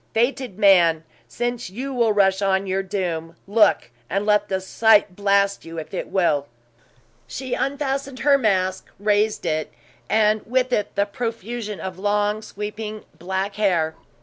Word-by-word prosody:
Fated 240 Hz, -2 st, 0 dB
man, 175 Hz, -6 st, +5 dB, 0.2 s
since 240 Hz, -3 st, -3 dB
you 260 Hz, +8 st, -5 dB
will 235 Hz, -3 st, +2 dB
rush 195 Hz, -1 st, +3 dB
on 195 Hz, 0 st, +1 dB
your 190 Hz, 0 st, 0 dB
doom, 175 Hz, -4 st, -3 dB
Look! 210 Hz, -, +3 dB, 0.2 s
and 195 Hz, +3 st, -1 dB
let 210 Hz, -1 st, +2 dB
the 190 Hz, -1 st, 0 dB
sight 210 Hz, 0 st, +3 dB
blast 200 Hz, 0 st, +2 dB
you, 165 Hz, 0 st, -9 dB
if 160 Hz, +2 st, -7 dB
it 185 Hz, -, -3 dB
will!" 155 Hz, -7 st, +1 dB, 0.8 s
She 260 Hz, -1 st, -5 dB
unfastened 275 Hz, -2 st, -2 dB
her 285 Hz, +1 st, +5 dB
mask, 190 Hz, -5 st, 0 dB
raised 210 Hz, +1 st, +1 dB
it, 155 Hz, 0 st, -1 dB, 0.4 s
and 215 Hz, 0 st, +3 dB
with 255 Hz, +1 st, +1 dB
it 210 Hz, -, -1 dB
the 200 Hz, 0 st, +2 dB
profusion 225 Hz, -1 st, -5 dB
of 185 Hz, +2 st, -6 dB
long, 205 Hz, +1 st, 0 dB
sweeping 210 Hz, 0 st, -6 dB
black 190 Hz, +3 st, -3 dB
hair. 175 Hz, -7 st, +1 dB
205 Hz, 150 wpm, -22 LUFS, 190-225 Hz, 0.8 s, man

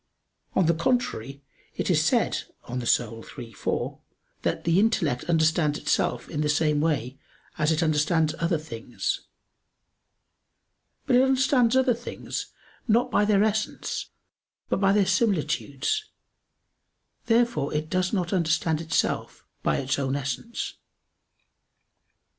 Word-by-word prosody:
On 185 Hz, -, +4 dB
the 170 Hz, -, +4 dB
contrary, 145 Hz, -, -1 dB, 0.3 s
It -, -, 0 dB
is -, -, +3 dB
said -, -, +1 dB, 0.2 s
(De -, -, -10 dB
Anima 120 Hz, -2 st, 0 dB, 0.2 s
iii, 115 Hz, -2 st, -8 dB
4) -, -, -3 dB, 0.4 s
that -, -, -1 dB
"the 170 Hz, +2 st, +3 dB
intellect 170 Hz, -, +1 dB
understands 160 Hz, -2 st, +2 dB
itself -, -, 0 dB
in 150 Hz, -, -3 dB
the 150 Hz, -, 0 dB
same 150 Hz, -1 st, +2 dB
way 135 Hz, -5 st, -1 dB, 0.4 s
as 155 Hz, +1 st, +3 dB
it 160 Hz, +2 st, +1 dB
understands 155 Hz, 0 st, +2 dB
other 170 Hz, 0 st, +1 dB
things." 120 Hz, -6 st, -4 dB, 1.8 s
But 245 Hz, -, +4 dB
it -, -, +6 dB
understands 260 Hz, -2 st, +3 dB
other 260 Hz, -1 st, +4 dB
things, 240 Hz, +1 st, -6 dB, 0.4 s
not 235 Hz, +2 st, +3 dB
by 205 Hz, -, +3 dB
their 205 Hz, -1 st, +4 dB
essence, 215 Hz, 0 st, -2 dB, 0.6 s
but -, -, +1 dB
by 195 Hz, 0 st, +4 dB
their 200 Hz, -1 st, +4 dB
similitudes. 190 Hz, -, 0 dB, 1.2 s
Therefore 235 Hz, -9 st, +2 dB
it 150 Hz, +1 st, -2 dB
does 185 Hz, +2 st, 0 dB
not 180 Hz, -3 st, -1 dB
understand 160 Hz, -2 st, +1 dB
itself 160 Hz, -2 st, -1 dB, 0.2 s
by -, -, +1 dB
its 135 Hz, 0 st, -1 dB
own 135 Hz, 0 st, -1 dB
essence. 140 Hz, -, -4 dB
165 Hz, 125 wpm, -26 LUFS, 145-210 Hz, 1.8 s, it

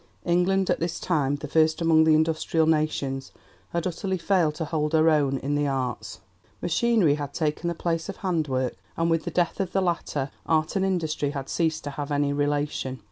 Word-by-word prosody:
England, 180 Hz, +2 st, +2 dB
at -, -, 0 dB
this 170 Hz, 0 st, -2 dB
time 145 Hz, -5 st, 0 dB
the 145 Hz, +1 st, -6 dB
first 160 Hz, +2 st, +2 dB
among 160 Hz, -1 st, +4 dB
the 160 Hz, -1 st, +5 dB
Industrial 160 Hz, +1 st, +1 dB
Nations, 150 Hz, -4 st, 0 dB, 0.4 s
had 170 Hz, -1 st, -2 dB
utterly 185 Hz, +2 st, -2 dB
failed 170 Hz, -3 st, +1 dB
to 160 Hz, -, -3 dB
hold 150 Hz, -1 st, -1 dB
her 160 Hz, 0 st, +5 dB
own 140 Hz, -3 st, +2 dB
in 140 Hz, +3 st, -3 dB
the 145 Hz, 0 st, +1 dB
Arts. 125 Hz, -6 st, -3 dB, 0.4 s
Machinery 190 Hz, -2 st, +2 dB
had 145 Hz, -1 st, -5 dB
taken 155 Hz, +1 st, -1 dB
the 170 Hz, -, -1 dB
place 165 Hz, 0 st, -2 dB
of 195 Hz, -, -5 dB
handwork, 150 Hz, -9 st, -1 dB, 0.2 s
and 165 Hz, 0 st, +1 dB
with 165 Hz, -1 st, +1 dB
the -, -, -1 dB
death 175 Hz, -1 st, 0 dB
of 190 Hz, -2 st, -2 dB
the 195 Hz, -, +2 dB
latter 150 Hz, -6 st, -1 dB, 0.2 s
art 155 Hz, +1 st, +1 dB
and 190 Hz, -, +1 dB
industry 160 Hz, -6 st, 0 dB
had 140 Hz, -2 st, -5 dB
ceased 160 Hz, -2 st, 0 dB
to 145 Hz, -, -4 dB
have 145 Hz, +1 st, -5 dB
any 145 Hz, 0 st, +1 dB
relation. 145 Hz, -2 st, -1 dB
155 Hz, 195 wpm, -25 LUFS, 145-170 Hz, 0.4 s, the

